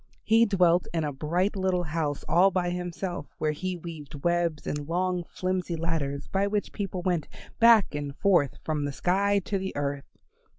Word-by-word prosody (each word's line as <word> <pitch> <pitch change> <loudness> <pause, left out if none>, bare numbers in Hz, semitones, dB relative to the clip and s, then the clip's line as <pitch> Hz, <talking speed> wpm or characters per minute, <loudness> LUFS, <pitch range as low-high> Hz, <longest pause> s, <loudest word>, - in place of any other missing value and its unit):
He 225 +1 +5
dwelt 180 -3 +3
in 165 - +1
a 145 -1 -2
bright 175 +9 0
little 185 -2 +1
house 155 -3 -2
all 185 +3 +5
by 180 -1 0
himself, 180 -2 -4
where 155 - 0
he 185 +4 -3
weaved 155 -4 -9
webs 170 -3 0
and 145 -1 -3
long 180 +1 0
flimsy 185 -2 -2
ladders 160 -4 -2
by 195 +1 +1
which 205 0 -2
people 190 -3 -4
went 175 -4 0 0.3
back 230 -6 +6
and 145 -1 -4
forth 175 -10 +3
from 150 -2 -1
the 145 - -3
sky 200 +6 +2
to 195 - -1
the 190 0 -4
earth. 140 -1 -4
175 Hz, 175 wpm, -27 LUFS, 150-190 Hz, 0.3 s, back